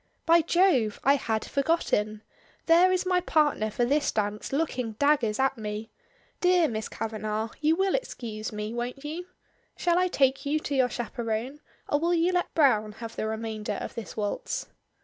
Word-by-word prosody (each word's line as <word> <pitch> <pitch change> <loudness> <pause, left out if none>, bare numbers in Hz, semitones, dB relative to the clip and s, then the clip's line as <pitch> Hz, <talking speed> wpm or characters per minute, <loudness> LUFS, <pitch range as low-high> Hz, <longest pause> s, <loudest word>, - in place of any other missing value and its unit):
"By 335 +1 +6
Jove! 315 - +2
I 275 - +5
had 220 -5 -2
forgotten! 220 -8 0 0.4
There 345 +3 +6
is 370 0 +1
my 365 -1 +3
partner 295 -10 +2
for 240 +3 0
this 290 +3 +1
dance 210 0 -2
looking 260 -6 -1
daggers 245 -3 +2
at 265 -2 +1
me. 210 +1 -5 0.5
Dear 360 -2 +4
Miss 220 -3 -4
Kavanagh, 215 0 -3
you 310 +1 +3
will 385 +1 +1
excuse 225 - -4
me, 210 +1 -4
won't 245 +4 -4
you? 335 +4 -5 0.5
Shall 345 0 +2
I 365 - +3
take 270 -5 +2
you 290 +1 +1
to 295 - -4
your 260 -2 +3
chaperone, 235 +3 -3 0.3
or 290 - +1
will 340 +2 +2
you 340 +2 +2
let 355 -1 0
Browne 215 -9 +3
have 230 +1 -8
the 215 - -2
remainder 220 -1 -3
of - - -6
this 220 -5 -7
waltz?" 205 -1 -2
260 Hz, 170 wpm, -27 LUFS, 220-325 Hz, 0.5 s, By